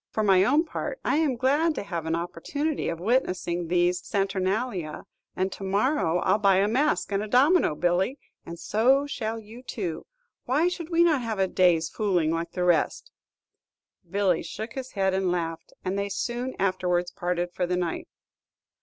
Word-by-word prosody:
For 215 - -1
my 190 -2 +5
own 290 - +3
part, 415 - -5
I - - +2
am 305 -5 +2
glad 290 +6 +2
to - - -3
have 170 -5 -4
an 160 - +1
opportunity 280 - -3
of 165 - -4
witnessing 180 -5 0
these 175 +1 +1
Saturnalia, 195 -3 -2 0.3
and 190 +1 -1
to 195 - -8
morrow 200 - +1
I - - +3
'll - - +3
buy 200 -2 +4
a 195 +2 +3
mask 265 +2 +1
and 200 0 0
a 215 - -4
domino, 270 - +4
Billy, 180 - +1 0.3
and 170 - -8
so 255 +10 +2
shall 225 -5 -3
you 225 +3 -12
too. 180 -10 -5 0.4
Why 300 +8 +2
should 345 -2 -6
we 340 0 +4
not 315 -6 +3
have 225 -3 -3
a 190 0 +2
day's 175 -3 +3
fooling, 180 -7 0
like 165 +1 -3
the 180 - -1
rest?" 175 -4 +1 1.0
Billy 190 -2 +1
shook 220 +8 -6
his 260 -1 -6
head 190 -2 +1
and 190 -1 +1
laughed, 165 -2 -3
and 190 +2 -1
they 200 0 -2
soon 240 +5 -3
afterwards 180 -2 0
parted 175 0 -2
for 180 0 -1
the 180 0 0
night. 175 -2 -3
195 Hz, 180 wpm, -26 LUFS, 175-250 Hz, 1.0 s, my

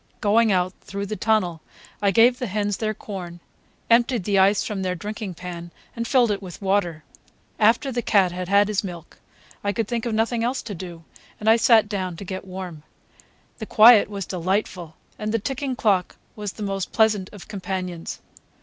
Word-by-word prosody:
Going 220 +2 +3
out 185 0 +1
through 200 0 -5
the 215 +2 -4
tunnel, 205 -7 0 0.4
I 200 - +3
gave 235 +5 +4
the 250 - -2
hens 205 0 -1
their 215 -1 -2
corn, 180 -5 -7 0.5
emptied 235 -2 +3
the 200 0 +2
ice 195 +2 +4
from 205 -3 -4
their 185 -1 -1
drinking 205 +1 -6
pan, 175 0 -7 0.3
and 230 0 -3
filled 245 -5 +3
it 200 -1 -2
with 180 -5 -9
water. 190 -5 0 0.6
After 230 +6 +3
the 240 -1 -1
cat 195 -6 +3
had 180 0 -5
had 200 +1 +5
his 210 -1 -1
milk, 175 -4 -9 0.4
I 200 - +1
could 220 +1 -2
think 235 0 -2
of 225 - -1
nothing 230 +1 0
else 250 +3 -1
to 220 - -6
do, 170 -2 -8 0.4
and 215 - -5
I 220 - +7
sat 230 -2 +5
down 190 -4 -3
to 200 - -8
get 190 +1 -6
warm. 180 -4 -7 0.8
The 220 - -6
quiet 220 -1 +7
was 200 -3 -5
delightful, 180 -2 -2 0.2
and 215 0 -2
the 230 - +2
ticking 265 +3 -3
clock 195 -6 +1 0.2
was 210 -2 -5
the 215 - -7
most 195 -2 -3
pleasant 215 -4 +2
of 205 -3 -12
companions. 185 -3 -5
200 Hz, 190 wpm, -23 LUFS, 185-220 Hz, 0.8 s, I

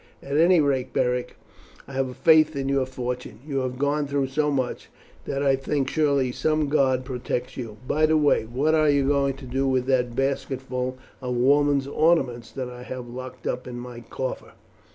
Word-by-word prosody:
At 140 - -3
any 170 +3 +5
rate, 135 -3 0
Beric, 125 0 0 0.5
I 140 - -10
have 135 -1 0
a 125 - -9
faith 155 -1 +5
in 135 -1 -2
your 135 -1 +1
fortune. 125 -3 -5
You 140 -3 -2
have 130 -1 -3
gone 145 +1 0
through 140 -1 0
so 150 +2 +1
much, 130 -3 -2 0.4
that 140 0 -2
I 135 -1 +4
think 135 +1 -1
surely 140 -5 +2
some 155 +2 0
god 130 -3 +2
protects 125 -1 -3
you. 115 -5 -6
By 155 +2 +3
the 155 0 +3
way, 145 -6 +3
what 135 +8 0
are 155 -1 +4
you 140 -2 +3
going 140 -1 +2
to 135 0 -11
do 135 +2 -1
with 130 -1 +1
that 125 -3 +1
basketful 130 -1 -2 0.2
of 125 -1 -2
women's 140 +2 +3
ornaments 140 -6 +1
that 130 -2 -4
I 125 0 -9
have 125 -1 -7
locked 130 0 -8
up 125 +1 -3
in 125 -1 -6
my 120 -1 -8
coffer?" 125 +3 -5
135 Hz, 195 wpm, -25 LUFS, 125-145 Hz, 0.5 s, any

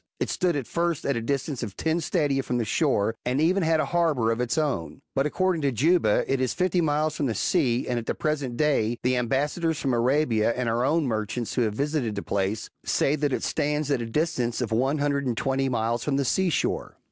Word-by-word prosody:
It - - -1
stood 180 -3 +1
at 140 -4 -2
first 170 +5 -1
at 140 - +1
a 115 - -2
distance 135 +2 -2
of 105 -5 -6
ten 160 +1 0
stadia 145 -5 +1
from 125 -2 -2
the 120 - 0
shore, 115 -4 +1
and 125 +3 0
even 180 +5 +3
had 160 -1 +2
a - - +2
harbour^ 150 -9 +1
of 115 - -3
its 125 +6 -1
own. 135 - -2
But 135 +2 +1
according 185 +1 0
to 140 -2 +1
Juba, 140 - +3
it 135 -1 0
is 130 - 0
fifty 180 -1 +1
miles 155 0 +1
from 140 - -1
the 115 - -2
sea; 135 - +1
and 125 -1 0
at 115 - -9
the - - -1
present 145 -6 -2
day, 120 -7 +1
the 125 +1 +2
am 125 -1 0
bassadors 150 +5 0
from 135 - 0
Arabia, 120 -2 +2
and 125 -1 -2
our 115 +2 +1
own 155 +4 +2
merchants 110 -1 -2
who 125 - +1
have 110 -3 0
visited 140 -5 -1
the 100 - -4
place, 100 +2 -1 0.2
say 140 - +1
that 145 -1 0
it - - -1
stands 150 0 -1
at 135 -4 +1
a 115 - -4
distance 125 -3 -1
of 125 -4 -2
one 130 +6 +1
hundrc^d 140 -1 0
and 120 -2 -1
twenty 135 0 0
miles 115 -1 -1
from 140 -2 0
the 140 - 0
sea 185 +9 +2
shore. - - -2
135 Hz, 240 wpm, -26 LUFS, 120-155 Hz, 0.2 s, even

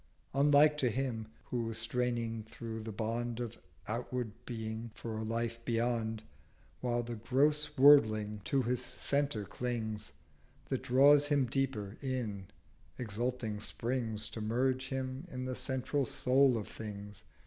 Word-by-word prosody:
Unlike 145 +2 +5
to 125 - +3
him, 115 -2 -2 0.2
who 115 -2 -1
straining 115 0 -1
through 110 +1 -7
the 110 0 -5
Bond 115 +2 -2
Of 120 -3 -5 0.3
outward 120 +1 -2 0.2
Being 110 -1 -4
for 110 0 -5
a 110 - -3
Life 115 +1 -2
beyond, 115 -2 0 0.6
While 120 -1 0
the 120 -1 -5
gross 145 +6 +2
Worldling 110 -7 +6
to 135 -2 +2
his 125 +1 0
Centre 140 -7 -1
clings, 110 -2 -3 0.6
That - - 0
draws 140 +3 +6
him 145 -3 +3
deeper 120 -6 -2
in, 115 -8 -3 0.5
exulting 115 -1 -2
springs 115 -1 -2
To 110 - -6
merge 130 +4 +1
him 130 +2 -3
in 130 -2 -4
the 130 - -2
central 130 +1 -1
Soul 130 -1 +4
of 105 - -4
Things. 105 -2 -8
120 Hz, 135 wpm, -33 LUFS, 110-130 Hz, 0.6 s, Worldling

